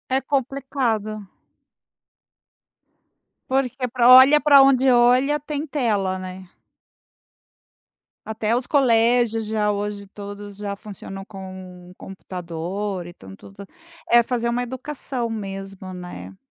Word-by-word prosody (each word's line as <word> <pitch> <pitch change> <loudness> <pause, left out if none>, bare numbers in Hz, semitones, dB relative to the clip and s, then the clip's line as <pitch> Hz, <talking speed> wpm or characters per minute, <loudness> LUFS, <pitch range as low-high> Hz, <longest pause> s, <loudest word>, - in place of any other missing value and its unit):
É 270 - +1
complicado. 255 -6 -2 2.2
Porque 260 -1 -1
para 245 0 +3
olha 260 +4 +9
para 285 -1 +7
onde 270 -1 +4
olha, 250 +4 +4
tem 295 0 -5
tela, 210 -10 -1
né. 185 0 -9 1.8
Até 220 +1 -1
os 245 0 -2
colégios, 235 -4 +2
já 210 -1 0
hoje 205 0 -4
todos 205 0 -10
já 205 -1 -4
funcionam 195 -1 -9
com 185 -2 -11
o 180 - -18
computador. 185 +1 -6
Então 95 - -12
tudo 200 - -13 0.4
é 235 0 +6
fazer 235 -1 -2
uma 245 +1 -1
educação 255 -1 -4
mesmo, 195 -3 -7
né. 95 - -9
215 Hz, 110 wpm, -22 LUFS, 195-255 Hz, 2.2 s, olha